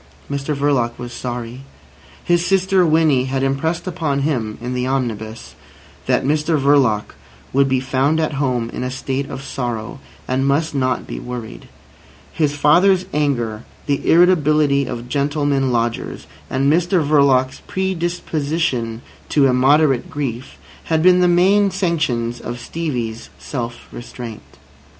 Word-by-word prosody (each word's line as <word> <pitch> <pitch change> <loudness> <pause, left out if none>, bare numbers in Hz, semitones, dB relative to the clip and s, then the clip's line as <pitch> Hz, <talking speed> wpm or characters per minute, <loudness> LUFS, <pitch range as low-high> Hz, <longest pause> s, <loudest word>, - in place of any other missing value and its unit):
Mr 140 +1 -2
Verloc 135 -5 0
was 120 0 -7
sorry. 120 0 -5 0.6
His 175 0 +2
sister 190 0 +2
Winnie 155 -5 +3
had 135 0 -1
impressed 140 +5 -1
upon 160 -6 -1
him 120 -8 -1
(in 125 +2 -4
the 125 0 -1
omnibus) 115 -4 -3 0.5
that - - +2
Mr 150 +2 +1
Verloc 135 -7 +2 0.4
would 135 +1 +3
be 130 -1 +2
found 135 +4 +1
at 155 -1 0
home 125 -4 -1
in - - -4
a 125 - -2
state 135 +1 -3
of 135 - -6
sorrow, 120 -2 -4 0.3
and 130 +1 0
must 150 +3 +1
not 130 -2 0
be - - -6
worried. 125 -3 -7 0.7
His 150 -2 0
father's 180 +6 +4
anger, 120 -7 0 0.2
the 140 -2 -1
irritability 150 -5 +4
of 120 0 -6
gentlemen 140 -1 0
lodgers, 115 -1 -2 0.2
and 135 +3 +2
Mr 175 -1 +2
Verloc's 135 -3 +3
predisposition 165 -9 -2 0.3
to 145 -2 +3
immoderate 135 +1 +3
grief, 130 -3 -5 0.3
had 160 -1 +1
been 180 0 +6
the 180 - +4
main 195 +4 +4
sanctions 155 - -1
of 120 0 -6
Stevie's 120 -7 -4
self 120 -3 -6
restraint. 120 -2 -8
140 Hz, 135 wpm, -19 LUFS, 125-155 Hz, 0.7 s, been